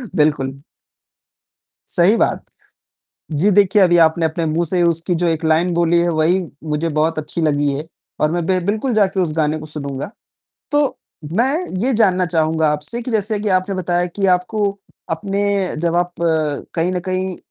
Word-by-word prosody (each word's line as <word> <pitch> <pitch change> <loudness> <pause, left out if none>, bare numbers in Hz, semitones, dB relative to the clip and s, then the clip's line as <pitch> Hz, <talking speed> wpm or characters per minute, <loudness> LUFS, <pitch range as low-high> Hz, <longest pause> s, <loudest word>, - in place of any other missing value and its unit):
बिल्कुल। 140 -2 0 1.3
सही 180 +6 +4
बात। - - 0 0.9
जी, 160 +8 +2
देखिए 205 +1 +4
अभी 175 -2 +4
आपने 160 +1 +1
अपने 160 +1 -2
मुँह 160 +2 0
से 180 +2 +1
उसकी 170 +1 +1
जो 175 +1 0
एक 165 0 -1
लाइन 160 +3 +2
बोली 170 0 +2
है 175 - +1
वही 165 +3 +2 0.2
मुझे 155 +1 -1
बहुत 155 +1 0
अच्छी 150 +2 -4
लगी 145 -2 +1
है 150 +3 -5 0.3
और 150 - +2
मैं 175 -1 -1
बे 185 -1 +2
बिल्कुल 220 +5 0
जाके 200 -3 +2
उस 170 -4 0
गाने 155 0 +1
को 155 - -9
सुनूँगा। 140 -1 -5 0.6
तो, 290 -2 +2 0.3
मैं 245 +9 +2 0.3
ये 265 - +2
जानना 185 -5 +3
चाहूँगा 160 -1 +1
आपसे 150 +11 -3
कि 250 - -5
जैसे 215 -1 0
कि 210 - -1
आपने 185 +2 -5
बताया 175 -1 0
कि 200 -1 +1
आपको 195 +4 -3 0.5
अपने 195 +4 -2 0.4
जब 170 0 0
आप 175 0 0
कहीं 160 +1 -1
न 180 - -1
कहीं 185 0 -2
170 Hz, 170 wpm, -19 LUFS, 155-190 Hz, 1.3 s, सही